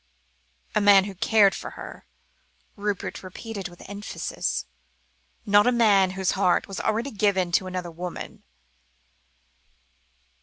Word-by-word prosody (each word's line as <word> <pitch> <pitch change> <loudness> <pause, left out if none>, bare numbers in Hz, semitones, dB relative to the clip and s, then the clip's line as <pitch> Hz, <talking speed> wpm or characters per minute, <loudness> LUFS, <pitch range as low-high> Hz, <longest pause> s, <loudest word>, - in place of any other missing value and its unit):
"A - - +2
man 200 -1 +7
who 200 0 -6
cared 200 +1 +4
for - - -6
her," - - -10 0.7
Rupert 205 -2 -3
repeated 195 +2 -7
with 175 - -14
emphasis; 65 - -3 0.8
"not 205 +2 +5
a - - +5
man 210 -6 +4
whose 190 -1 +1
whole 195 0 0
heart 180 - +3
was 195 -1 -6 0.4
given 195 -4 +1
to 185 +2 +1
another 180 -2 -4
woman." 175 +2 -7
195 Hz, 120 wpm, -25 LUFS, 185-205 Hz, 0.8 s, man